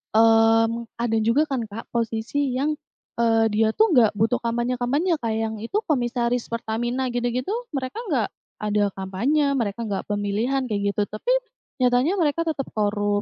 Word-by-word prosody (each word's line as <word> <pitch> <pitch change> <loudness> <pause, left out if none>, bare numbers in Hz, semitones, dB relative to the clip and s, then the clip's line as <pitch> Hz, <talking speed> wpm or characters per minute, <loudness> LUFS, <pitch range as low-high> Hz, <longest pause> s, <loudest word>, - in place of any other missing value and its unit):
mmm, 225 +1 +4
ada 235 -1 0
juga 230 +7 +3
kan 270 -5 -2
Kak, 215 +2 -9
posisi 235 +4 -1
yang, 280 +4 +1 0.5
eee, 225 -1 +4
dia 220 +1 +3
tuh 440 -2 +4
gak 235 -8 +4
butuh 225 +4 +1
kampanye 240 +1 -1
kampanye 300 +7 +1
Kak, 225 -2 -2
yang 220 -1 -2
itu 230 - -6
komisaris 245 -4 0
Pertamina 240 +3 -2
gitu 245 0 -1
gitu 250 +8 -2 0.2
mereka 260 - -3
gak 250 - +1 0.3
ada 210 -1 +1
kampanye, 260 +10 +1
mereka 230 -3 -2
gak 200 -3 -3
pemilihan 210 +6 0
kayak 200 -3 -1
gitu 210 - 0
tapi, 215 - -6 0.5
nyatanya 250 +10 +3
mereka 320 -1 +1
tetap 315 -5 -2
korup 205 -1 0
235 Hz, 160 wpm, -24 LUFS, 220-260 Hz, 0.5 s, mmm